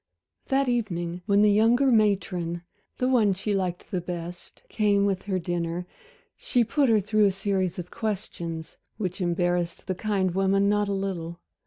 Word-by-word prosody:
That 275 -1 +2
evening 180 -8 -1
when 200 0 +4
the 210 - +5
younger 235 +6 +4
matron 185 -6 +1 0.3
the 255 - +1
one 220 -7 +3
she 205 +3 -2
liked 185 -1 -2
the 185 -3 -1
best 175 0 -7
came 205 -2 +2
with 195 -2 0
her 195 -2 0
dinner, 175 0 -2 0.5
she 245 - +1
put 270 +4 +2
her 220 -2 +5
through 210 +1 +2
a 200 - +4
series 190 -2 -1
of 180 -1 -6
questions, 170 -7 -4 0.2
which 185 -2 -3
embarrassed 175 -1 0
the 190 - -1
kind 190 -2 0
woman 195 +1 +2
not 205 0 +2
a - - -2
little. 180 -4 -3
195 Hz, 165 wpm, -26 LUFS, 175-210 Hz, 0.5 s, the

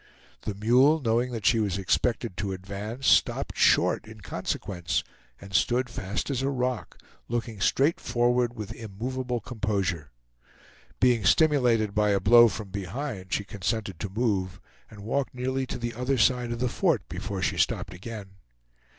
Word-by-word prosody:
The 105 - -4
mule, 125 +9 +4
knowing 120 -1 +1
that 115 -4 -5
she 115 - +4
was 100 -3 0
expected 110 +2 0
to 100 -2 -2
advance, 100 +7 -6
stopped - - +3
short - - +3
in 110 -1 -12
consequence, 90 -1 -3 0.4
and 100 0 -12
stood 120 +7 +2
fast 105 +5 -3
as 130 -2 -1
a 135 - 0
rock, 125 -3 -2 0.3
looking 115 -3 -3
straight 140 +10 +2
forward 120 0 +1
with 105 0 -6
immovable 120 +3 -4
composure. 100 - -2 0.9
Being 125 -4 +3
stimulated 120 - +3
by 105 0 +2
a 100 -1 +3
blow 120 +5 +7
from 105 -1 -5
behind 100 +1 -5
she 100 - 0
consented 100 -1 -3
to 100 - -4
move, 95 -4 -1 0.3
and 105 -2 -12
walked 130 +6 -2
nearly 130 +1 -2
to - - -4
the 120 -1 -4
other 125 +3 -1
side 125 0 +2
of 120 - -2
the 125 +2 0
fort 150 - 0
before 95 +1 -4
she - - 0
stopped - - 0
again. 100 +1 -8
115 Hz, 160 wpm, -27 LUFS, 100-125 Hz, 0.9 s, blow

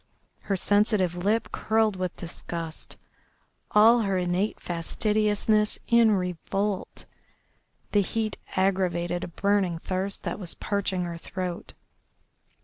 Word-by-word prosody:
Her 200 - -1
sensitive 205 -2 +2
lip 205 +6 0
curled 220 -2 +1
with 185 -1 -3
disgust, 165 -1 -6 0.7
all 225 +3 +6
her 195 -3 0
innate 180 +3 0
fastidiousness 210 +4 +1
in 235 -1 +5
revolt. 190 +2 -2 0.9
The 205 - +4
heat 215 +2 -2 0.2
aggravated 180 -2 +1
a - - -3
burning 195 -1 +1
thirst 190 +3 -3
that - - -3
was 180 -4 -4
parching 195 -3 -1
her 170 -1 -5
throat. 180 0 -5
195 Hz, 110 wpm, -27 LUFS, 175-210 Hz, 0.9 s, all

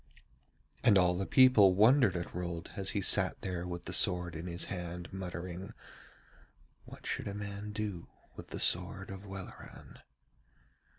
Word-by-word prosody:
And 100 - +6
all 90 -1 +3
the 95 +2 -3
people 120 -8 +6
wondered 110 -1 +5
at 85 - -6
Rold 85 -2 -5
as 95 -1 -1
he 100 - -1
sat - - +3
there 90 -2 -4
with 85 -1 -6
the - - -5
sword 90 -2 +2
in 80 +3 -6
his 85 0 -4
hand 90 -1 -6
muttering, 90 +2 -6 1.1
'What - - -13
should - - -3
a 100 - -5
man 100 0 -6
do 105 -5 -5 0.3
with - - -10
the - - -7
sword 95 +3 +2
of 95 +1 -9
Welleran?' 95 -1 -10
95 Hz, 155 wpm, -32 LUFS, 90-100 Hz, 1.1 s, And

